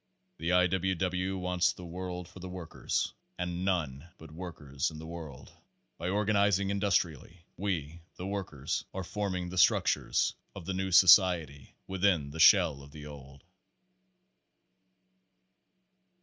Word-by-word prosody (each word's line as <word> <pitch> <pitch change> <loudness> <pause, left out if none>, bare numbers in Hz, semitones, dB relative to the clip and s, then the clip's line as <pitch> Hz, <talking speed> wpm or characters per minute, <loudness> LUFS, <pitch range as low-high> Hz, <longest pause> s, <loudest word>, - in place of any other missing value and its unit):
The 80 +2 -1
I. 90 0 +5
W. 95 +1 0
W. 95 +1 -1
wants 90 -1 +1
the 90 - -10
world 90 0 -6
for 95 - -13
the 90 +1 -7
workers, 90 -3 -3 0.2
and 90 0 -3
none 85 -5 -2
but 80 -1 -13
workers 75 -5 -4
in 80 - -10
the 80 - -8
world. 80 -5 -9 0.5
"By 85 - -2
organizing 100 -1 +2
indus 100 -1 +1
trially, 85 +1 -2
we 85 -4 -3
(the 90 - -7
workers) 95 -9 -3
are 95 - -3
forming 95 -2 -3
the 90 0 -2
structure 80 - +3 0.4
of - - -8
the 95 - -2
new 95 0 -2
society 90 -6 +5
within 90 -6 +1
the 80 - -8
shell 70 -3 +6
of 70 - -13
the 75 0 -10
old." 70 -2 -12
90 Hz, 140 wpm, -30 LUFS, 80-95 Hz, 0.5 s, shell